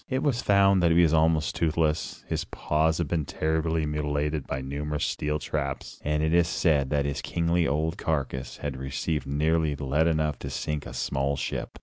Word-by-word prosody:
It 130 0 0
was 130 -5 +1
found 100 -1 +4
that 85 - +4
he 85 +1 +5
was 80 -2 +3
almost 80 -1 +3
toothless, 80 -1 0
his - - -1
paws 80 +1 0
had 85 - -1
been 80 -1 0
terribly 80 +2 0
mutilated 75 0 -1
by 65 - -2
numerous 75 +3 -3
steel 75 0 -1
traps, 70 -2 -4
and 75 +1 0
it 80 +1 +1
is 85 -1 +4
said 75 -6 +2
that 70 -2 +1
his 70 -1 -2
kingly 85 0 +1
old 80 +3 -1
carcass 65 -5 -2
had 70 -3 -4
received 65 +2 -3
nearly 75 +1 +1
lead 75 +3 +1
enough 75 -3 0
to - - -5
sink 75 -1 -3
a - - -8
small 70 +1 0
ship. 70 - -4
75 Hz, 190 wpm, -27 LUFS, 70-80 Hz, -, he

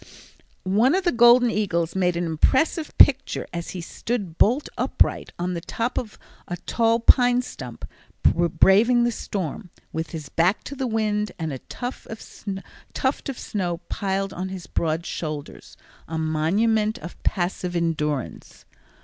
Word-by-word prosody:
One 220 - +3
of 380 - 0
the 350 - +2
golden 240 0 +6
eagles 170 -6 -1
made 180 -2 +1
an 175 - -1
impressive 265 - +1
picture 275 -1 +5
as 170 -1 -4
he 180 - -5
stood 195 -1 -4
bolt 250 +8 +3
upright - - +1
on 180 +1 -2
the 170 - -4
top 230 +7 -3
of 220 -4 -8 0.3
a 175 - -4
tall 230 +5 +1
pine 245 +1 +5
stump, - - -8 0.4
braving 200 +8 +4
the 240 - +2
storm, 190 -3 -5 0.2
with 160 +1 -3
his 155 -4 -7
back 175 +8 +1
to 280 - -7
the 265 -1 -2
wind 210 -2 -1
and 160 -3 -3
a 130 - -5
tuft 245 +1 -6
of 225 +5 -5
snow 180 -4 -2
piled 195 0 -2
on 185 +1 -4
his 185 -2 -7
broad 165 +1 -1
shoulders, 155 -3 -6 0.3
a 160 - -4
monument 205 +8 +1
of 170 - -10
passive 180 -1 -1
endurance. 150 -5 -2
195 Hz, 145 wpm, -24 LUFS, 170-235 Hz, 0.4 s, golden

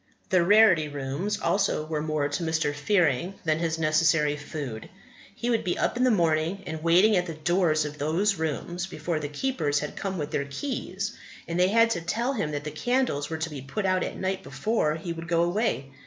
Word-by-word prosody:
The 185 -2 +4
Rarity 190 -5 +5
Rooms 145 +9 -3
also 195 -7 +1
were 155 -1 -2
more 155 -2 0
to 145 +4 -3
Mr. 160 -2 0
Fearing 170 +1 +1
than 155 0 +1
his 165 -1 -1
necessary 155 -1 +3
food. 145 -6 -6 0.5
He 240 +1 -1
would 230 - +1
be 180 - -1
up - - 0
in 250 - +1
the 255 - +5
morning 170 -1 +1
and 160 -2 -5
waiting 180 +6 +5
at 180 -1 +1
the 165 - -5
doors 155 -1 +2
of 150 0 -7
those 170 +8 +1
rooms 170 +3 -3
before 170 -3 -3
the 145 -1 -4
keepers 150 - -1
had 150 0 -3
come 195 -1 -3
with 150 -2 -4
their 140 - -1
keys. 200 - -4 0.3
And 170 +1 -2
they 180 - +5
had 230 +2 +4
to 170 - -1
tell 230 +10 -1
him 205 - -1
that 145 -1 -4
the 150 - -5
candles 155 - 0
were 160 - -3
to 160 0 -3
be 140 -3 -6
put 140 +10 -4
out 185 -1 +2
at - - -5
night 190 0 -2
before 150 +2 -1
he 170 +1 -4
would 165 0 -8
go 170 -1 +2
away. 175 - -1
165 Hz, 215 wpm, -26 LUFS, 150-195 Hz, 0.5 s, Rarity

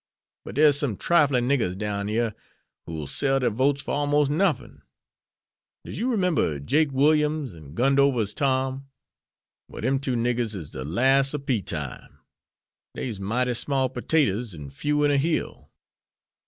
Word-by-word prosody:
But - - -8
dere's 145 -1 +5
some 125 -10 -1
triflin' 140 -7 +3
niggers 115 -10 0
down 100 -1 -3
yere 110 +1 0 0.5
who'll 80 -2 -5
sell 135 - +1
der 125 - +1
votes 135 +5 +1
for - - -5
almost 145 0 +1
nuffin. 190 +6 0 1.0
Does - - -6
you 240 0 0
'member 175 - +1
Jake 145 - +1
Williams 150 - +2
an' 75 -2 -13
Gundover's 135 -4 +2
Tom? 135 0 -1 0.8
Well - - -9
dem 135 +2 +1
two 130 -2 -2
niggers 120 -2 0
is 80 -6 -7
de 65 - -6
las' 135 - +2
ob 140 -1 -6
pea 120 -6 0
time. 75 -6 -6 0.8
Dey's 110 -6 -4
mighty 120 +6 0
small 130 +1 0
pertaters 120 - 0
an' 70 -3 -9
few 150 - 0
in 145 - +3
a 140 - +3
hill." 155 +4 -2
130 Hz, 150 wpm, -25 LUFS, 105-145 Hz, 1.0 s, dere's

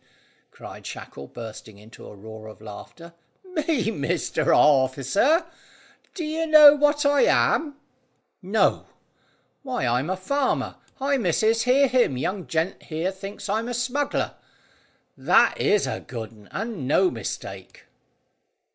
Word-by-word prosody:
cried - - -12
Shackle, 70 0 -9
bursting 110 - -10
into 110 +3 -14
a - - -12
roar 110 +2 -11
of 110 - -12
laughter. 115 +11 -11 0.3
"Me, 310 - -1
Mr 165 -2 -2
Orficer? 145 - +3 0.7
Do 350 - -4
you 320 +1 -2
know 305 -2 +9
what 295 0 +1
I 285 0 +4
am?" 300 -3 +2 0.7
"No." 200 +4 +1 0.7
"Why, 255 - -3
I'm 125 +6 0
a 185 - -1
farmer. 275 +8 -1 0.2
Hi, 275 +1 0
missus, 225 +2 +1
hear 270 +3 +4
him! 245 - +2
Young 185 +8 -3
gent 165 +3 -2
here 165 +4 -3
thinks 195 +2 -8
I'm 220 +3 -1
a 245 - -3
smuggler. 255 +4 -1 0.8
That - - +3
is 210 - +2
a - - -3
good 115 -4 -8
un, 105 -2 -18
and 210 - -5
no 360 - +3
mistake." - - -7
200 Hz, 130 wpm, -24 LUFS, -, 0.8 s, know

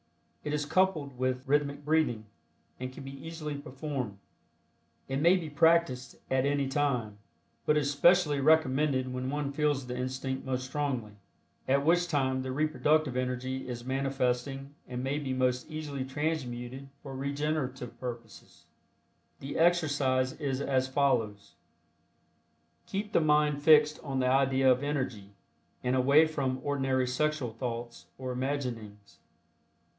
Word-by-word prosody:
It 150 - -3
is 150 -1 -1
coupled 155 -5 +1
with 130 0 0
rhythmic 145 0 0
breathing, 150 -8 +1 0.5
and 130 0 -4
can 130 - -10
be 135 0 -9
easily 160 -2 -5
performed. 135 -6 -5 0.9
It 135 +1 -2
may 170 +4 +6
be 170 -3 -5
practiced 150 -4 +2 0.2
at 130 -1 +3
any 140 -1 +1
time, 125 -7 -1 0.5
but 150 - +4
is 145 -1 +1
specially 150 0 +4
recommended 135 -3 +3
when 125 +1 -3
one 145 0 -2
feels 145 -2 0
the 125 0 -5
instinct 130 +1 -3
most 130 -1 -2
strongly, 130 -5 -2 0.6
at 140 +1 +2
which 175 +2 +3
time 130 -4 0
the 130 0 -4
reproductive 155 -1 +1
energy 130 +1 -2
is 120 -1 -6
manifesting 135 +1 -1
and 125 0 -4
may 140 +3 -1
be 135 -3 -3
most 125 +1 0
easily 150 -3 -4
transmuted 135 -2 -3
for 135 -2 -7
regenerative 135 -3 -3
purposes. 115 -3 -8 0.7
The 140 +3 -5
exercise 145 -7 +2
is 135 -4 -2
as 130 -2 +1
follows: 125 -7 0 1.3
Keep 205 +2 -4
the - - +4
mind 150 -1 +3
fixed 150 0 +5
on 135 -3 -3
the 130 - +2
idea 135 0 +4
of 125 +1 +2
Energy, 130 -9 -3 0.5
and 125 +1 +1
away 140 +5 +5
from 135 -5 -2
ordinary 135 -2 +1
sexual 130 -1 -1
thoughts 120 0 -5
or 130 -1 -4
imaginings. 125 -6 -4
135 Hz, 135 wpm, -30 LUFS, 130-150 Hz, 1.3 s, may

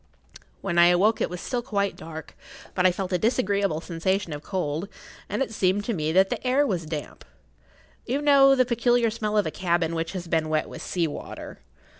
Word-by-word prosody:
When 175 -3 0
I 170 - +8
awoke 195 +6 +3
it - - +1
was 180 0 -6
still 245 +4 -2
quite 200 -4 -1
dark, 160 0 -9 0.4
but 180 0 +3
I - - +4
felt 185 +1 -4
a 180 - +2
disagreeable 200 -7 +1
sensation 180 +1 -1
of 145 - -6
cold, 175 +1 -3 0.4
and - - 0
it 225 - -7
seemed 200 0 +1
to 235 - -1
me 155 -4 -1
that 190 +3 +4
the - - -3
air 260 +3 +3
was 175 - -2
damp. 155 -2 -6 0.8
You 260 +4 0
know 280 -2 +6
the 255 -1 +3
peculiar 240 -1 +2
smell 215 -1 -2
of 210 - +3
a 155 - -2
cabin 170 -2 0
which 165 +1 -3
has 180 -2 -5
been 160 -1 0
wet 155 0 0
with - - -9
sea 175 -2 -1
water. 150 - -7
190 Hz, 205 wpm, -25 LUFS, 165-225 Hz, 0.8 s, I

